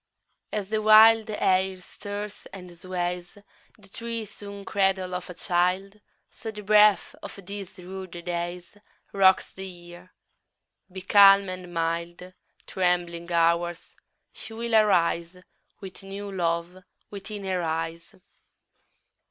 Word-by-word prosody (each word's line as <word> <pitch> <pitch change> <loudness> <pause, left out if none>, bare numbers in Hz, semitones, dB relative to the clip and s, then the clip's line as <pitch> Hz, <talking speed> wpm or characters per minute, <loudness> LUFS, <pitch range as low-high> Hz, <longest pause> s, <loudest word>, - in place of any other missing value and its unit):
3. - - -2
As 195 - -13
the 220 -1 0
wild 220 +1 +7
air 190 -2 +1
stirs 205 +2 -8
and 180 -2 -11
sways 180 +1 -4 0.4
The 205 -2 -18
tree 230 +1 -4
swung 200 0 -10
cradle 190 -2 0
of 180 0 -5
a 180 - -8
child, 185 +4 -1 0.3
So 225 - -8
the 210 -1 -8
breath 210 0 +4
of - - -9
these 200 -1 -8
rude 185 +1 -8 0.2
days 175 +2 -5 0.4
_15 200 - -7
Rocks 190 -1 +4
the 190 0 -7
Year: 175 0 -13 0.8
be 190 +1 -7
calm 195 0 +6
and 185 -1 -7
mild, 170 +2 -3 0.3
Trembling 175 -2 -1
Hours, 170 0 0 0.4
she 225 - -9
will 235 +1 -4
arise 175 -4 +2 0.4
With 190 0 -9
new 200 +1 -7
love 175 0 -2 0.3
within 205 0 -7
her 185 -2 -1
eyes. 165 +3 -4
185 Hz, 125 wpm, -26 LUFS, 175-200 Hz, 0.8 s, wild